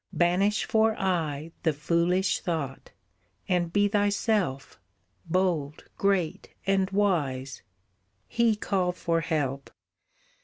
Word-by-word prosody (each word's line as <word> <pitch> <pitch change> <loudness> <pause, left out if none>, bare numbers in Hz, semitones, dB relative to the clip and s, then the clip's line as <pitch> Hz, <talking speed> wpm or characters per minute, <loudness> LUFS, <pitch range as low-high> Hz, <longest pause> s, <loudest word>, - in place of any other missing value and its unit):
Banish 185 +4 +2
for 220 0 +2
aye, 165 -5 -1
the 160 - +1
foolish 170 +5 +1
thought, 150 -6 -4 0.6
And 175 -2 0
be 205 +2 +3
thyself, 205 - 0 0.5
bold, 165 -4 0
great, 195 -5 0 0.2
and 195 -1 +2
wise. 145 -10 0 0.7
"He 235 -2 +2
call 185 -3 0
for 165 -2 -1
help! 140 -4 -2
180 Hz, 100 wpm, -27 LUFS, 155-200 Hz, 0.7 s, be